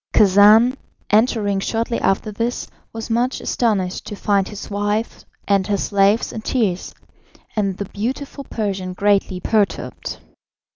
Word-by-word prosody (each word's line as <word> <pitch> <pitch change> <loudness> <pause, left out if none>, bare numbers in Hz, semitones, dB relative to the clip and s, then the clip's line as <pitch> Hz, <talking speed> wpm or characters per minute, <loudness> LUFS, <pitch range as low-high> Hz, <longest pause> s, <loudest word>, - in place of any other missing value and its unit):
Khacan, 210 +5 +6 0.4
entering 210 -2 +2
shortly 230 +3 -1
after 195 +2 +1
this, 230 +4 -2 0.2
was 225 0 -6
much 245 +3 +1
astonished 200 -6 -1
to 205 - -5
find 200 -1 +1
his 210 - -8
wife 205 +2 -2 0.2
and 195 -2 +2
her 205 -1 +1
slaves 200 +2 +2
in 220 - -5
tears, 215 -7 -1 0.6
and 195 -3 0
the 200 - -3
beautiful 265 +8 -4
Persian 195 -6 -3
greatly 195 -1 +1
perturbed. 210 +1 -1
205 Hz, 130 wpm, -20 LUFS, 195-225 Hz, 0.6 s, Khacan